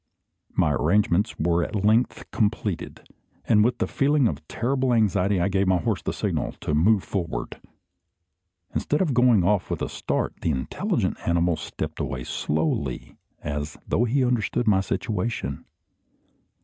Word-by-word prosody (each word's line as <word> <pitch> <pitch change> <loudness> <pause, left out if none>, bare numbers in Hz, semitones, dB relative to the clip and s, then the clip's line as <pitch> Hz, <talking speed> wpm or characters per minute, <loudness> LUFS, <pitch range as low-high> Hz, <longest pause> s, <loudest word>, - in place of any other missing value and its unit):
My - - +3
arrangements 100 +4 +2
were 85 +1 +1
at 105 -1 -2
length 110 +4 +1
completed; 105 -4 -2 0.4
and 105 -2 +4
with 120 +3 +1
a - - +1
feeling 140 -2 +2
of 75 -3 -5
terrible 130 +1 0
anxiety 100 -3 +2
I 85 - +2
gave 100 0 +1
my 95 -1 +4
horse 85 - -1
the - - -2
signal - - -2
to 75 - -2
move 95 +7 +3
forward. 90 -5 -4 1.1
Instead 150 +5 +1
of 155 -7 0
going 120 -5 +4
off 100 +1 +1
with - - -2
a - - -2
start, - - -2
the - - 0
intelligent 65 -4 -1
animal 85 0 +2
stepped - - -6
away 65 -2 -3
slowly, 75 -4 -2 0.3
as 75 +1 -4
though 120 - +2
he 130 +2 +2
understood 120 -1 0
my 95 -3 +4
situation. 95 - -3
100 Hz, 150 wpm, -25 LUFS, 85-115 Hz, 1.1 s, and